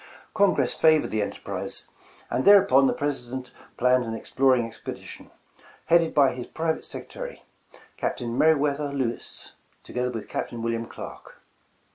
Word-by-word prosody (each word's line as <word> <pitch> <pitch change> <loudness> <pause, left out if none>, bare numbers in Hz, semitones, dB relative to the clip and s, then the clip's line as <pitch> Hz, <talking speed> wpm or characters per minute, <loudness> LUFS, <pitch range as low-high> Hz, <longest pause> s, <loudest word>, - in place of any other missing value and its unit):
Congress 200 -1 +3
favored 155 -1 +3
the 110 - 0
enterprise, 100 - -2 0.4
and 130 - 0
thereupon 185 -10 +6
the - - +3
President 130 -3 -3 0.3
planned 125 0 +3
an 115 -1 -4
exploring 130 +1 +2
expedition, 115 0 -8 0.6
headed 165 0 +4
by 140 -3 +4
his 125 -1 -7
private 160 0 -2
secretary. - - -7 0.5
Captain 120 -2 -2
Meriwether 145 -1 +2
Lewis, 130 -4 -4 0.3
to - - -12
gether 125 0 0
with 115 -3 -6
Captain 115 -1 -4
William 115 0 -2
Clark. - - -10
130 Hz, 130 wpm, -25 LUFS, 120-155 Hz, 0.6 s, thereupon